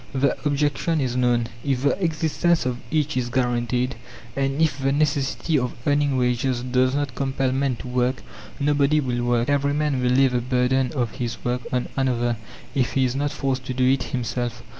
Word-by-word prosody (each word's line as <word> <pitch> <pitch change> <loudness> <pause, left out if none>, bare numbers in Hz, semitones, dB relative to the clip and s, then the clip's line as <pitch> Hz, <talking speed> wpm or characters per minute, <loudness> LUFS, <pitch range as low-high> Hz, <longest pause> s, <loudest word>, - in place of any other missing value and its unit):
The 140 +1 +2
objection 145 +3 +1
is 130 -3 -1
known. 120 -2 +2 0.2
"If 135 -2 0
the 185 +7 +1
existence 165 0 +1
of 125 -1 -2
each 155 -1 0
is 125 -1 -1
guaranteed, 125 0 0 0.4
and 135 +1 0
if 155 -4 +2
the 135 0 +1
necessity 145 +1 +1
of 125 -1 -3
earning 145 -2 +2
wages 125 0 0
does 130 +1 +2
not 145 -3 -1
compel 135 -1 -1
men 135 -1 0
to 120 - -9
work, 125 +1 0 0.4
nobody 145 +1 +3
will 125 -4 -1
work. 120 -1 +1
Every 145 0 +1
man 150 -3 0
will 125 - +2
lay 135 +2 +5
the 125 -1 0
burden 125 +1 +1
of 120 -6 -1
his 120 -2 -4
work 125 0 0
on 125 -1 0
another 120 -3 0 0.4
if 130 -3 0
he 135 -1 +3
is 125 0 -1
not 145 +1 0
forced 135 -3 -2
to 130 - -3
do 130 0 +2
it 135 - -1
himself." 120 -1 -3
130 Hz, 190 wpm, -23 LUFS, 125-145 Hz, 0.4 s, lay